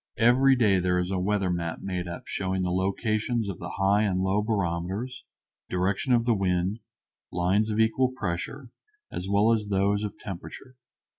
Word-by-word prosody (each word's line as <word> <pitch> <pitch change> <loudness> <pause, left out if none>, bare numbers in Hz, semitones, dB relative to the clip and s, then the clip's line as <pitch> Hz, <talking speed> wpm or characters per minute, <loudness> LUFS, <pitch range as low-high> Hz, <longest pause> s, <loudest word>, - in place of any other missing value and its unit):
Every 130 +4 +5
day 105 -6 +3
there 90 0 +1
is 90 +1 -1
a 95 - 0
weather 95 -1 0
map 85 -2 -3
made 90 -2 -3
up 85 - -6
showing 95 -1 -2
the 90 - 0
locations 110 +4 0
of 95 -4 -5
the - - -6
high 100 +2 +3
and 100 -4 +1
low 95 +2 +1
barometers, 100 +4 -2 0.4
direction 95 +8 0
of 120 -1 +4
wind, 95 -2 +1 0.5
lines 95 +5 +1
of 110 0 -1
equal 120 +4 +3
pressure, 125 +4 -4 0.4
as 90 - -4
well 105 +3 +4
as 105 -2 -1
those 100 +1 +1
of 105 - -5
temperature. 100 +7 -9
100 Hz, 165 wpm, -27 LUFS, 90-110 Hz, 0.5 s, Every